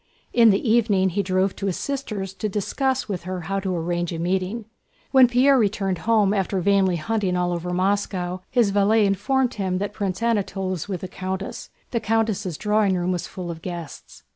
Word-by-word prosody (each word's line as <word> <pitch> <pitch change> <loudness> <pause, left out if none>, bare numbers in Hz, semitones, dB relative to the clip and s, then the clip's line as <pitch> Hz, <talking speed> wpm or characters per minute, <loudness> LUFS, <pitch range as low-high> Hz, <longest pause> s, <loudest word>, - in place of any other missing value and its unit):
In 230 -2 +6
the 200 +4 +2
evening 210 -4 +3
he 195 +3 0
drove 185 0 0
to 200 - -3
his 185 - -1
sister's 215 -9 -4
to 210 +2 -3
discuss 260 +6 -1
with 195 -4 -3
her 185 -1 -4
how 195 +4 -2
to 190 -2 -2
arrange 175 0 -2
a 165 - -4
meeting. 185 +6 -1 0.5
When 265 -2 +7
Pierre 255 +3 +4
returned 195 -4 0
home 210 -3 +4
after 195 -1 0
vainly 190 -1 +3
hunting 185 +2 -1
all 175 0 0
over 175 +1 -3
Moscow, 185 -1 -1
his 235 -5 +2
valet 205 +2 +3
informed 250 +6 +1
him 190 -3 -1
that 205 +2 -3
Prince 195 0 -3
Anatole 200 -4 0
was 185 +2 -4
with 185 -3 -3
the 185 - -4
countess. 190 +1 -5 0.2
The 235 - 0
countess' 215 -6 0
drawing 210 -2 +2
room 175 +1 0
was 175 -2 -2
full 180 -2 -6
of 165 -1 -9
guests. 170 -4 -8
195 Hz, 190 wpm, -23 LUFS, 185-215 Hz, 0.5 s, When